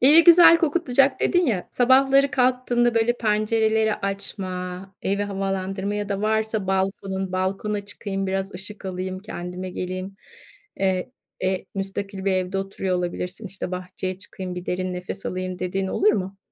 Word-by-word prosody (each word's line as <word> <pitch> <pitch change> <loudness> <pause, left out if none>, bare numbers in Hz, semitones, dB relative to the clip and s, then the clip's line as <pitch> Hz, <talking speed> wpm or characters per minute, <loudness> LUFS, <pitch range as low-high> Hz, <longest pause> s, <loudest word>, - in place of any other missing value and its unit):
"Evi 300 +6 +8
güzel 340 -1 +9
kokutacak." 280 -5 +2
dedin 355 -2 +3
ya, 200 -7 -1
sabahları 270 +2 +4
kalktığında, 250 -2 +2
böyle, 230 +1 +3
pencereleri 220 0 +2
açma, 190 -1 -4
evi 200 +1 0
havalandırma 195 0 -2
ya 205 -1 -3
da 200 -1 -2
varsa 220 -1 0
balkonun 190 0 -1
balkona 195 +3 -1
çıkayım 200 -1 -4
biraz 195 +1 -2
ışık 195 +3 -6
alayım, 185 0 -4
kendime 185 -2 -6
geleyim. 185 +2 -5 0.6
Eee, 190 +4 0 0.3
e, 185 0 -1
müstakil 195 0 -4
bir 195 - +2
evde 185 +1 -1
oturuyor 195 -1 -2
olabilirsin, 180 +4 -3
işte, 190 -1 -5
"Bahçeye 185 0 -4
çıkayım, 190 -2 -6
bir 180 0 -7
derin 185 0 -2
nefes 180 +2 -6
alayım." 185 0 -3
dediğin 190 +1 -2
oluyor 420 - +3
mu? 195 0 -4
195 Hz, 145 wpm, -24 LUFS, 185-220 Hz, 0.6 s, güzel